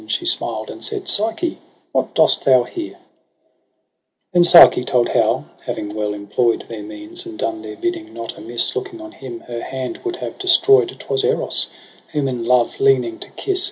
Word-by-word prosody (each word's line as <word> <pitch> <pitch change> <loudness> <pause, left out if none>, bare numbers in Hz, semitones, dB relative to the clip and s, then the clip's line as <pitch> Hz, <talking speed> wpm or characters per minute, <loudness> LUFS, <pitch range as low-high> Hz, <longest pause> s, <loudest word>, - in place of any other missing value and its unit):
She 345 - -2
smiled, 350 - -1
and - - -10
said 415 -3 -2
'Psyche, 225 - 0 0.3
what - - -1
dost - - +4
thou 130 -2 +5
here?' 330 - -7 1.4
■3,%, 175 - +6 0.3
Then^Psyche - - -3
told 125 -1 +1
how, - - +1 0.2
having 105 0 -4
well 105 -1 -2
employ'd 115 +3 -1
Their 115 -2 -7
means, 320 - -8
and 335 -1 -9
done 335 -1 -3
their - - -8
bidding 340 -1 -4
not - - -7
amiss. - - 0
Looking 390 -4 -5
on 325 0 -10
him 120 - -9
her 120 -1 -7
hand 130 -1 -5
would 365 -1 -3
have - - -7
destroy'd, 390 +2 +5
'Twas 420 -1 -2
Eros; 460 +1 0 0.5
whom 145 -2 0
in 125 -3 -3
love 125 - +2
leaning 405 -4 +2
to - - -6
kiss. 390 -2 0
325 Hz, 175 wpm, -19 LUFS, -, 1.4 s, ■3